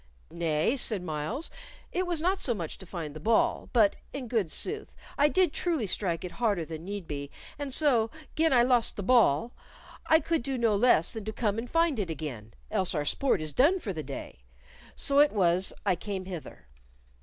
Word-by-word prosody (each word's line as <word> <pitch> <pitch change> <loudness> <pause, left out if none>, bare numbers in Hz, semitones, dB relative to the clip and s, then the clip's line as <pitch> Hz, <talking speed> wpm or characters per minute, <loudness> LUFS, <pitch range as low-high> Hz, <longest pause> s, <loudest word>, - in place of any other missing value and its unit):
"Nay," 165 - 0
said 215 -7 0
Myles; 160 - -4 0.4
"it 365 0 -1
was 340 -3 -1
not 375 +3 +1
so 245 -10 +1
much 170 -6 -6
to 190 - -11
find 165 -5 -6
the - - -6
ball, 225 +8 +1
but, 215 -5 +4 0.2
in 270 -3 -5
good 220 -7 0
sooth, 425 - -3 0.2
I 290 - +4
did 355 0 +2
truly 330 -10 -1
strike 175 -4 -1
it 180 - -6
harder 200 -3 0
than 160 0 -7
need 200 -1 -5
be, 140 -1 -5 0.3
and 285 -2 -4
so, 255 -6 +3 0.3
gin 320 0 +3
I 245 -2 +5
lost 245 -2 +3
the 200 - -4
ball, 230 - +3 0.5
I 320 - +6
could 325 0 -1
do 265 +2 -3
no 230 -3 +2
less 200 -6 +4
than 220 - -6
come 215 -1 -1
and 240 +1 -6
find 330 -6 +2
it 190 -4 -2
again, 130 -9 -6 0.2
else 190 -4 0
our 150 -1 -1
sport 255 - +1
is 155 -1 -2
done 325 +9 +4
for 210 - -4
the 160 - -4
day. 135 - -8 0.5
So 280 0 +2
it 295 0 +6
was 185 -2 +2
I 190 -3 +3
came 190 +1 -5
hither." 180 -4 -8
215 Hz, 200 wpm, -28 LUFS, 170-275 Hz, 0.5 s, I